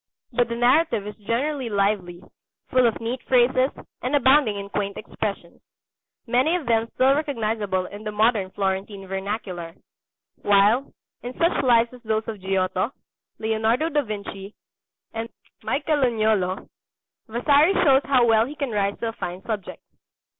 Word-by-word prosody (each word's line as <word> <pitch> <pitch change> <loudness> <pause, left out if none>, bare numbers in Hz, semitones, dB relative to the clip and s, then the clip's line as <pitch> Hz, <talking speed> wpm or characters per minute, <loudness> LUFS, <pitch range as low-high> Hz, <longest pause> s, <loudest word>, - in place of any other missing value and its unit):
But 240 0 +1
the 235 - -2
narrative 245 -1 +2
is 210 - -7
generally 265 +1 -1
lively, 195 -4 -1 0.5
full 255 -1 +4
of 225 - -1
neat 235 +3 -4
phrases, 255 +1 +3 0.3
and 255 +4 0
abounding 265 -5 +4
in 200 0 -5
quaint 200 -1 -3
expressions 200 -6 -5 0.6
many 255 +8 +2
of 345 -5 -3
them 230 -1 +1
still 265 +1 +4
recognizable 220 - -1
in 205 +3 -9
the 215 - -4
modern 210 -2 +2
Florentine 195 +1 -3
vernacular 190 -3 -5 0.7
while, 205 +6 +3 0.3
in 245 +1 -7
such 335 +1 +2
Lives 235 -1 +3
as 250 - -13
those 220 -1 -1
of 215 -4 -6
Giotto, 190 +3 0 0.5
Leonardo 225 +7 0
da 295 -2 +1
Vinci, 200 -3 -7 0.6
and 225 0 -4 0.3
Michelagnolo, 220 -10 0 0.6
Vasari 285 - +3
shows 275 -4 +5
how 255 -3 +4
well 225 0 +4
he 295 - -8
can 280 -4 -3
rise 200 -1 0
to 230 - -1
a - - -7
fine 180 -3 -6
subject. 210 -5 -5
225 Hz, 145 wpm, -24 LUFS, 200-255 Hz, 0.7 s, shows